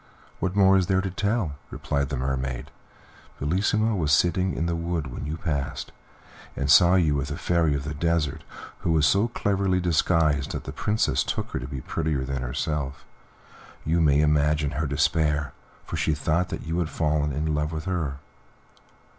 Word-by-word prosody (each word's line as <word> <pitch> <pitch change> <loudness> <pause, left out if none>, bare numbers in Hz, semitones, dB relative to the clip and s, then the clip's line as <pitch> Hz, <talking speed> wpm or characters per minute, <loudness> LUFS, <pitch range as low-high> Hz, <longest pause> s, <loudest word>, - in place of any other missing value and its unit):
"What 95 +1 -2
more 95 -1 +6
is 90 -2 +1
there 95 -1 +2
to 95 0 -2
tell 105 +5 0
you?" 75 - -5 0.2
replied 70 -2 -2
the 70 - -2
Mermaid. 65 +1 -3 0.7
"Bellissima 105 +8 +1
was 80 -6 0
sitting 90 +4 +2
in 80 - -1
the 85 0 -1
wood 85 -2 -2
when 70 - -5
you 80 +2 -3
passed, 75 -5 -3 0.6
and 70 0 0
saw 90 +2 +7
you 80 -5 +3
with 70 -1 -1
the 75 +4 -4
Fairy 85 -4 +1
of 70 - -3
the 75 +1 -4
Desert, 80 -1 -1 0.4
who 85 - 0
was 80 -2 +3
so 100 +10 +3
cleverly 100 -5 0
disguised 80 -4 +1
that - - -4
the - - -6
Princess 110 +1 0
took - - -3
her - - -2
to - - -6
be 65 - -6
prettier 75 -5 -2
than 65 -1 -3
herself; 70 +2 -3 0.8
you 85 +2 +2
may 75 -2 +4
imagine 75 -1 +2
her 75 +2 -2
despair, 75 -1 +1 0.3
for - - -4
she 80 - +1
thought 80 +5 0
that - - -5
you 80 +2 -1
had 85 -3 -1
fallen 75 -2 0
in 75 +3 -1
love 75 +1 -1
with 80 -1 -5
her." 80 -7 -2
75 Hz, 185 wpm, -25 LUFS, 70-90 Hz, 0.8 s, saw